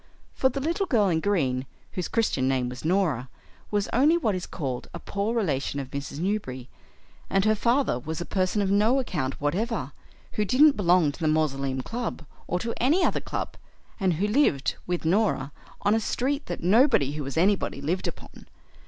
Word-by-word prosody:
For 260 Hz, -, +2 dB
the 270 Hz, +2 st, -3 dB
Little 340 Hz, +7 st, -1 dB
Girl 210 Hz, -6 st, +3 dB
in 165 Hz, -2 st, +2 dB
Green, 135 Hz, -10 st, 0 dB, 0.2 s
whose 180 Hz, -, -3 dB
Christian 175 Hz, -, +1 dB
name 130 Hz, -2 st, +1 dB
was 125 Hz, 0 st, -8 dB
Norah, 160 Hz, -8 st, +1 dB, 0.4 s
was 205 Hz, -1 st, 0 dB
only 295 Hz, +8 st, +5 dB
what 225 Hz, -11 st, 0 dB
is 185 Hz, -1 st, -4 dB
called 130 Hz, -5 st, -4 dB
a -, -, -5 dB
poor 200 Hz, +6 st, -2 dB
relation 145 Hz, -, -1 dB
of 135 Hz, -1 st, -6 dB
Mrs. 140 Hz, 0 st, -5 dB
Newberry, 150 Hz, -, -3 dB, 0.6 s
and 195 Hz, +1 st, +2 dB
her 215 Hz, -, +5 dB
father 235 Hz, -, +1 dB
was 155 Hz, +5 st, -5 dB
a 175 Hz, -, -4 dB
person 190 Hz, +2 st, 0 dB
of 195 Hz, -, 0 dB
no 215 Hz, +6 st, +4 dB
account 155 Hz, -, -2 dB
whatever, 180 Hz, -, -1 dB, 0.4 s
who 210 Hz, -, 0 dB
didn't 275 Hz, +8 st, +5 dB
belong 175 Hz, -6 st, +3 dB
to 145 Hz, -, -13 dB
the 160 Hz, -, 0 dB
Mausoleum 135 Hz, -4 st, 0 dB
Club 225 Hz, -, -4 dB, 0.2 s
or 180 Hz, -, 0 dB
to 230 Hz, +5 st, -3 dB
any 300 Hz, +10 st, +3 dB
other -, -, 0 dB
club, -, -, -4 dB, 0.4 s
and 190 Hz, -3 st, +2 dB
who 190 Hz, +6 st, 0 dB
lived, 210 Hz, -, +2 dB
with 175 Hz, -2 st, -2 dB
Norah, 170 Hz, -6 st, +1 dB, 0.3 s
on 205 Hz, -, +3 dB
a 225 Hz, -, +3 dB
street 275 Hz, +6 st, -1 dB
that 175 Hz, -, -5 dB
nobody 210 Hz, -, +4 dB
who 150 Hz, +1 st, -4 dB
was 135 Hz, +3 st, -5 dB
anybody 190 Hz, -4 st, +2 dB
lived 165 Hz, +7 st, -1 dB
upon. -, -, -9 dB
185 Hz, 190 wpm, -26 LUFS, 140-225 Hz, 0.6 s, only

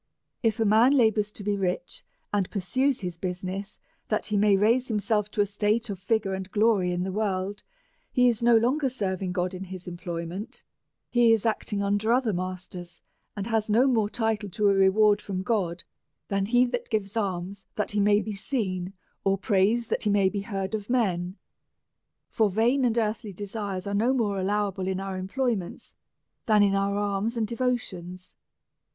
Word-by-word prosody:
If 225 Hz, -2 st, +1 dB
a 225 Hz, -, +2 dB
man 225 Hz, +6 st, +5 dB
labours 220 Hz, -5 st, +3 dB
to 205 Hz, -, -8 dB
be 205 Hz, 0 st, 0 dB
rich, 195 Hz, -, -3 dB, 0.3 s
and 200 Hz, -3 st, +1 dB
pursues 255 Hz, +8 st, 0 dB
his 180 Hz, -3 st, -4 dB
business, 185 Hz, +3 st, -4 dB, 0.3 s
that 215 Hz, -, 0 dB
he 210 Hz, -, -1 dB
may 205 Hz, -1 st, +4 dB
raise 230 Hz, +6 st, +3 dB
himself 210 Hz, -1 st, 0 dB
to 210 Hz, -, 0 dB
a -, -, +3 dB
state 210 Hz, +3 st, 0 dB
of 195 Hz, -, -6 dB
figure 200 Hz, -1 st, 0 dB
and 190 Hz, 0 st, -5 dB
glory 205 Hz, -3 st, +2 dB
in 175 Hz, 0 st, -1 dB
the 190 Hz, -, -3 dB
world, 200 Hz, -1 st, -2 dB, 0.5 s
he 250 Hz, -1 st, +4 dB
is 235 Hz, -2 st, +1 dB
no 235 Hz, -1 st, +6 dB
longer 265 Hz, +5 st, +2 dB
serving 190 Hz, -6 st, -2 dB
God 180 Hz, 0 st, -1 dB
in 185 Hz, +1 st, -6 dB
his 185 Hz, -1 st, -8 dB
employment; 175 Hz, +6 st, -6 dB, 0.5 s
he 240 Hz, -2 st, +5 dB
is 225 Hz, -1 st, +2 dB
acting 210 Hz, -2 st, -1 dB
under 205 Hz, +3 st, +1 dB
other 245 Hz, -3 st, +2 dB
masters, 180 Hz, -1 st, -5 dB, 0.4 s
and 200 Hz, -, -2 dB
has 225 Hz, -1 st, 0 dB
no 230 Hz, +5 st, +4 dB
more 225 Hz, -6 st, +2 dB
title 220 Hz, -2 st, -1 dB
to 205 Hz, +2 st, +2 dB
a -, -, +4 dB
reward 205 Hz, +2 st, +4 dB
from 190 Hz, -2 st, -4 dB
God 180 Hz, -6 st, -1 dB, 0.5 s
than 195 Hz, -1 st, 0 dB
lie 245 Hz, +4 st, +4 dB
that 245 Hz, -, -3 dB
gives 210 Hz, -2 st, -2 dB
alms 195 Hz, -2 st, -3 dB
that 210 Hz, -, -1 dB
he 205 Hz, -, 0 dB
may 205 Hz, +1 st, +4 dB
be 215 Hz, -, -5 dB
seen, 195 Hz, -5 st, -3 dB, 0.3 s
or 195 Hz, 0 st, +2 dB
prays 205 Hz, +4 st, +2 dB
that -, -, 0 dB
he 210 Hz, -, 0 dB
may 200 Hz, -2 st, +3 dB
be 200 Hz, 0 st, -3 dB
heard 195 Hz, -1 st, -4 dB
of 210 Hz, 0 st, -4 dB
men. 190 Hz, -6 st, 0 dB, 0.9 s
For 220 Hz, -2 st, +2 dB
vain 235 Hz, +7 st, +2 dB
and 235 Hz, -1 st, +1 dB
earthly 215 Hz, -2 st, -1 dB
desires 200 Hz, -1 st, -5 dB
are 200 Hz, -, -3 dB
no 230 Hz, +6 st, +2 dB
more 215 Hz, -6 st, 0 dB
alloAvable 195 Hz, -1 st, -1 dB
in 190 Hz, 0 st, -1 dB
our 195 Hz, 0 st, -4 dB
employ 235 Hz, +7 st, 0 dB
ments 180 Hz, -4 st, -8 dB, 0.5 s
than 210 Hz, -2 st, +5 dB
in 200 Hz, -1 st, +3 dB
our 200 Hz, 0 st, +1 dB
alms 205 Hz, +3 st, -1 dB
and 225 Hz, -, +1 dB
devotions. 205 Hz, -7 st, -3 dB
205 Hz, 185 wpm, -26 LUFS, 190-225 Hz, 0.9 s, no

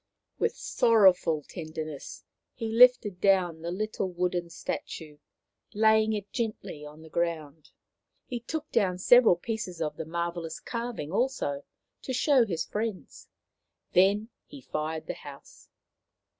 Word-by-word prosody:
With 460 Hz, +1 st, +1 dB
sorrowful 190 Hz, -, +4 dB
tenderness 155 Hz, -3 st, -7 dB, 0.3 s
he 225 Hz, -2 st, -4 dB
lifted 230 Hz, -5 st, +5 dB
down 180 Hz, -5 st, +3 dB
the 170 Hz, -, -4 dB
little 195 Hz, +1 st, -2 dB
wooden 175 Hz, -1 st, -1 dB
statue, 155 Hz, -2 st, -6 dB, 0.6 s
laying 220 Hz, 0 st, +4 dB
it 205 Hz, -2 st, -5 dB
gently 215 Hz, -9 st, -4 dB
on 150 Hz, +2 st, -11 dB
the 160 Hz, -, -13 dB
ground. 160 Hz, -3 st, -3 dB, 0.6 s
He 245 Hz, -, -4 dB
took 310 Hz, +6 st, -5 dB
down 190 Hz, -6 st, +2 dB
several 235 Hz, +1 st, +6 dB
pieces 185 Hz, -2 st, -5 dB
of 150 Hz, -2 st, -3 dB
the 160 Hz, -, -4 dB
marvellous 170 Hz, 0 st, -4 dB
carving 235 Hz, -10 st, -5 dB
also 195 Hz, -, -1 dB, 0.4 s
to 260 Hz, -, -4 dB
show 255 Hz, -2 st, +4 dB
his 170 Hz, -5 st, -2 dB
friends. 215 Hz, -2 st, -5 dB, 0.7 s
Then 200 Hz, +4 st, +4 dB, 0.2 s
he 285 Hz, -, -11 dB
fired 155 Hz, -8 st, -4 dB
the -, -, -3 dB
house. 140 Hz, -1 st, -13 dB
185 Hz, 130 wpm, -28 LUFS, 160-225 Hz, 0.7 s, several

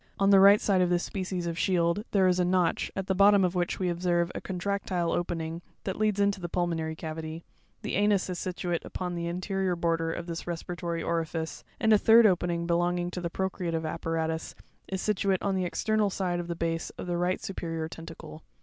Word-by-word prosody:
On 195 Hz, -1 st, +3 dB
the 195 Hz, -, +8 dB
right 200 Hz, +2 st, +8 dB
side 190 Hz, -3 st, +2 dB
of 180 Hz, -, +2 dB
this 175 Hz, 0 st, +1 dB
species 185 Hz, -2 st, -3 dB
of 170 Hz, 0 st, -3 dB
shield, 175 Hz, +1 st, +1 dB
there 190 Hz, -2 st, +3 dB
is 180 Hz, 0 st, +2 dB
a -, -, +4 dB
notch, 180 Hz, -1 st, +1 dB
at 195 Hz, -, -2 dB
the 190 Hz, -, +1 dB
bottom 200 Hz, +1 st, +6 dB
of 180 Hz, -1 st, +1 dB
which 175 Hz, -1 st, -1 dB
we 185 Hz, -, -1 dB
observe 175 Hz, 0 st, +1 dB
a -, -, -5 dB
contractile 185 Hz, -2 st, -2 dB
opening 165 Hz, -1 st, -2 dB
(fig. -, -, -22 dB
22, -, -, -36 dB
ro), -, -, -36 dB
that 190 Hz, -, -4 dB
leads 215 Hz, -2 st, +1 dB
into 200 Hz, -1 st, +2 dB
the 175 Hz, -, -4 dB
pulmonary 165 Hz, -3 st, -1 dB
cavity; 160 Hz, +1 st, -6 dB, 0.4 s
the -, -, -3 dB
anus 205 Hz, 0 st, +2 dB
is 180 Hz, -2 st, -4 dB
situate 175 Hz, -2 st, -2 dB
upon 180 Hz, -1 st, -4 dB
the 170 Hz, 0 st, -3 dB
anterior 185 Hz, +1 st, -1 dB
border 165 Hz, -1 st, 0 dB
of 170 Hz, -, -5 dB
this 170 Hz, 0 st, -6 dB
respiratory 170 Hz, 0 st, -4 dB
orifice, 165 Hz, -1 st, -2 dB, 0.2 s
and 220 Hz, -1 st, +4 dB
a 210 Hz, -, +6 dB
third 225 Hz, +2 st, +7 dB
opening 175 Hz, -3 st, +2 dB
belonging 175 Hz, +1 st, 0 dB
to 180 Hz, -, -5 dB
the 170 Hz, -, -2 dB
procreative 175 Hz, -3 st, -2 dB
apparatus 160 Hz, 0 st, -2 dB, 0.3 s
is 190 Hz, -1 st, -3 dB
situate 195 Hz, -2 st, +1 dB
on 200 Hz, -, +1 dB
the 185 Hz, -1 st, 0 dB
external 215 Hz, +3 st, +1 dB
side 180 Hz, -2 st, -1 dB
of 175 Hz, -, -4 dB
the 170 Hz, -, -3 dB
base 165 Hz, 0 st, -2 dB
of -, -, -5 dB
the 175 Hz, -1 st, -2 dB
right 180 Hz, +1 st, +1 dB
superior 165 Hz, -4 st, -4 dB
tentacle. 165 Hz, -1 st, -10 dB
175 Hz, 215 wpm, -28 LUFS, 170-190 Hz, 0.4 s, the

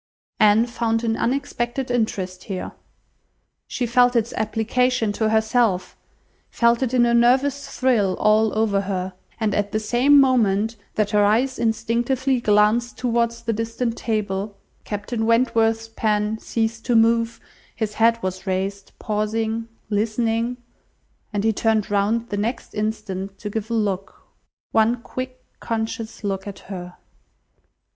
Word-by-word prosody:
Anne 215 Hz, +2 st, +5 dB
found 230 Hz, -1 st, -1 dB
an 225 Hz, -1 st, +1 dB
unexpected 250 Hz, 0 st, -2 dB
interest 190 Hz, -6 st, -2 dB
here. 190 Hz, -3 st, -5 dB, 1.0 s
She 250 Hz, -, -2 dB
felt 245 Hz, +1 st, +3 dB
its 235 Hz, 0 st, +1 dB
application 225 Hz, +1 st, 0 dB
to 215 Hz, +1 st, 0 dB
herself, 220 Hz, -3 st, +1 dB, 0.5 s
felt 235 Hz, +1 st, +2 dB
it 255 Hz, -3 st, 0 dB
in 245 Hz, -2 st, +4 dB
a 235 Hz, -, +2 dB
nervous 265 Hz, +4 st, +3 dB
thrill 225 Hz, -8 st, +2 dB
all 215 Hz, 0 st, +3 dB
over 210 Hz, -3 st, +2 dB
her; 190 Hz, -1 st, -3 dB, 0.3 s
and 215 Hz, -3 st, 0 dB
at 205 Hz, 0 st, -1 dB
the 215 Hz, -, 0 dB
same 250 Hz, +6 st, +4 dB
moment 225 Hz, -5 st, +3 dB, 0.2 s
that 210 Hz, -1 st, 0 dB
her 210 Hz, -1 st, +4 dB
eyes 240 Hz, +6 st, +2 dB
instinctively 235 Hz, +3 st, 0 dB
glanced 215 Hz, +3 st, +2 dB
towards 235 Hz, -1 st, 0 dB
the 230 Hz, -1 st, -1 dB
distant 230 Hz, +2 st, -2 dB
table, 205 Hz, -3 st, -2 dB, 0.3 s
Captain 220 Hz, +2 st, -3 dB
Wentworth's 225 Hz, -1 st, +2 dB
pen 215 Hz, -1 st, 0 dB
ceased 225 Hz, 0 st, -2 dB
to 240 Hz, -, +1 dB
move, 230 Hz, 0 st, +3 dB, 0.4 s
his 220 Hz, -2 st, -2 dB
head 230 Hz, +1 st, +3 dB
was 185 Hz, +1 st, -4 dB
raised, 195 Hz, +1 st, -3 dB
pausing, 220 Hz, +1 st, -2 dB, 0.2 s
listening, 225 Hz, +3 st, 0 dB, 0.7 s
and 205 Hz, -1 st, -1 dB
he 220 Hz, 0 st, +2 dB
turned 220 Hz, -1 st, +1 dB
round 215 Hz, +3 st, +1 dB
the 205 Hz, -, -2 dB
next 230 Hz, +4 st, -3 dB
instant 200 Hz, -3 st, -3 dB
to 210 Hz, -, -6 dB
give 220 Hz, +1 st, -4 dB
a -, -, -2 dB
look, 200 Hz, -3 st, -3 dB, 0.4 s
one 225 Hz, +2 st, +3 dB
quick, 255 Hz, 0 st, -6 dB, 0.2 s
conscious 225 Hz, -1 st, -4 dB
look 195 Hz, -1 st, -3 dB
at 200 Hz, -, -7 dB, 0.2 s
her. 180 Hz, -1 st, -7 dB
225 Hz, 135 wpm, -22 LUFS, 210-235 Hz, 1.0 s, Anne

